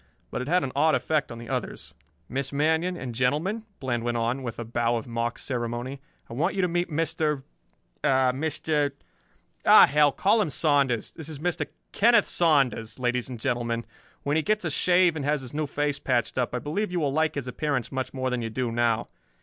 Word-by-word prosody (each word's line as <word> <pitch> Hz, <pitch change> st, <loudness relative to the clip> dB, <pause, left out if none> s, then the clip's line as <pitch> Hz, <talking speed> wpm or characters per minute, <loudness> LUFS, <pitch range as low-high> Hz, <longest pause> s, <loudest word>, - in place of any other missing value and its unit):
But -, -, -3 dB
it 125 Hz, -, -5 dB
had 180 Hz, +3 st, +2 dB
an 135 Hz, -, -3 dB
odd 155 Hz, +2 st, +4 dB
effect 155 Hz, -2 st, 0 dB
on 115 Hz, -, -7 dB
the 115 Hz, 0 st, -9 dB
others. -, -, -4 dB, 0.3 s
"Miss 135 Hz, +1 st, -3 dB
Manion, 160 Hz, +5 st, +1 dB
and 130 Hz, -5 st, -5 dB
gentlemen," 150 Hz, -, 0 dB
Bland 120 Hz, -3 st, -2 dB
went 120 Hz, 0 st, -1 dB
on, 120 Hz, +3 st, 0 dB
with 120 Hz, -3 st, -5 dB
a 120 Hz, -, -5 dB
bow 120 Hz, +1 st, 0 dB
of 115 Hz, -, -3 dB
mock 115 Hz, -1 st, -2 dB
ceremony, 125 Hz, +2 st, -4 dB, 0.3 s
"I -, -, -9 dB
want 165 Hz, -, 0 dB
you 190 Hz, -, +1 dB
to -, -, +3 dB
meet 175 Hz, +1 st, -1 dB
Mister 155 Hz, -2 st, -1 dB, 0.6 s
er, 130 Hz, -1 st, +3 dB
Mister 150 Hz, 0 st, -1 dB, 0.7 s
oh -, -, +9 dB
hell, 150 Hz, 0 st, +4 dB
call 205 Hz, +9 st, +3 dB
him 195 Hz, -, 0 dB
Saunders. 140 Hz, -5 st, +1 dB
This 160 Hz, -2 st, -9 dB
is 155 Hz, -, -6 dB
Mr. 175 Hz, +4 st, -2 dB, 0.2 s
Kenneth 235 Hz, +3 st, +4 dB
Saunders, 135 Hz, -10 st, +2 dB
ladies 125 Hz, 0 st, -1 dB
and 125 Hz, -3 st, -6 dB
gentlemen. 115 Hz, -1 st, -1 dB, 0.4 s
When 145 Hz, +1 st, 0 dB
he -, -, +3 dB
gets 210 Hz, +2 st, 0 dB
a 160 Hz, -, -1 dB
shave 180 Hz, +2 st, +3 dB
and 150 Hz, -, -3 dB
has 145 Hz, 0 st, +1 dB
his 125 Hz, 0 st, -8 dB
new 150 Hz, 0 st, -1 dB
face 145 Hz, 0 st, -1 dB
patched 125 Hz, -3 st, 0 dB
up 125 Hz, -1 st, -1 dB
I -, -, +1 dB
believe 165 Hz, -, -2 dB
you 180 Hz, -, 0 dB
will 145 Hz, -4 st, 0 dB
like 160 Hz, +1 st, +1 dB
his 140 Hz, -3 st, -3 dB
appearance 130 Hz, 0 st, -2 dB
much 130 Hz, -1 st, -3 dB
more 130 Hz, -1 st, -2 dB
than 125 Hz, -1 st, -1 dB
you 115 Hz, -, -3 dB
do 120 Hz, +1 st, -2 dB
now. 115 Hz, -1 st, +1 dB
140 Hz, 210 wpm, -26 LUFS, 120-160 Hz, 0.7 s, oh